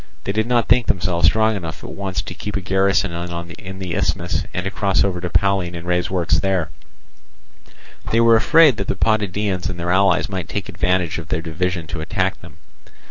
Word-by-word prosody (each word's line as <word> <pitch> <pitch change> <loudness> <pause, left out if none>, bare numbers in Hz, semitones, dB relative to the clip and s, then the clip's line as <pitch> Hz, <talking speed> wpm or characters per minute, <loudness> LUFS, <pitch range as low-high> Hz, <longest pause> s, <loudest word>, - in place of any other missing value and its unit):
They - - -2
did 110 +2 0
not 120 -2 +2
think 120 +1 +3
themselves 85 -3 +2
strong 110 +3 +3
enough 85 -5 -6
at - - -7
once 95 -2 -3
to - - -7
keep 105 0 -6
a - - 0
garrison 95 0 +1 0.5
in 95 0 -8
the 95 -3 -5
isthmus 85 +1 -1
and 90 0 -3
to 95 - -3
cross 100 -2 +1
over 90 -3 -1
to 90 - -3
Pallene 95 -2 +1
and 85 0 -7
raise 90 0 0
works 90 -3 +1
there; 95 -4 0 1.4
they 115 - +3
were 115 0 +6
afraid 150 +2 +5
that 100 - -3
the - - -1
Potidæans 105 -3 0
and 90 -2 -5
their 85 +1 -1
allies 95 -1 +3
might 95 -4 -5
take 100 -2 -3
advantage 90 -2 0
of 80 - -9
their 80 - -2
division 85 +1 -2
to 80 +1 -5
attack 80 - -1
them. - - -14
95 Hz, 200 wpm, -20 LUFS, 85-100 Hz, 1.4 s, were